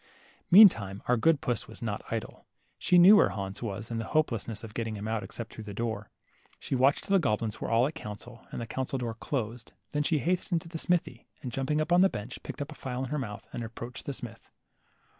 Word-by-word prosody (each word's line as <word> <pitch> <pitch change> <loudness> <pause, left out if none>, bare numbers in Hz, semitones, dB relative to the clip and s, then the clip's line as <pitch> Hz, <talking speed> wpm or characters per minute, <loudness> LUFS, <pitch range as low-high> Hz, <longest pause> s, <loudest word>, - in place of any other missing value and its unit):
Meantime 110 - +7
our 125 - +4
good 155 +6 +3
puss 125 -6 -2
was - - -9
not 110 -3 -2
idle. 115 -2 -5 0.4
She 180 - +4
knew 185 +5 +9
where - - +5
Hans 100 -1 -5
was, 115 0 -5
and. 115 0 -1
the - - -5
hopelessness 115 -7 -1
of 110 -1 -8
getting 115 -1 -3
him 105 +1 -5
out 110 -1 -1
except 115 -2 -7
through 110 - -8
the 100 -1 -7
door. 110 -2 -3 0.5
She - - -5
watched 135 +2 +3
till 195 - -2
the 195 - +6
goblins 110 - -1
were - - -2
all 115 +2 +4
at 150 - -2
council, 120 -4 -9
and - - -5
the 120 - -3
council 130 +3 -3
doc<r 120 -3 -3
closed. 120 -4 -4 0.2
Then 150 - 0
she 155 +2 +2
hastened 175 +2 0
to - - -12
the 165 -1 -5
smithy, 165 -10 -1 0.2
and, 125 - -4
jump 135 +2 -3
ing 150 0 +2
up 155 +3 -1
on 175 +1 +6
the 190 - +6
bench, 105 - -7
picked - - -5
up 145 - -11
a - - -6
file 130 -3 -4
in 130 - -4
her 150 - 0
mouth, 105 -6 -6
and 120 - -4
approached 120 +2 -8
the 140 - -2
smith. 115 -3 -9
120 Hz, 240 wpm, -29 LUFS, 110-150 Hz, 0.5 s, knew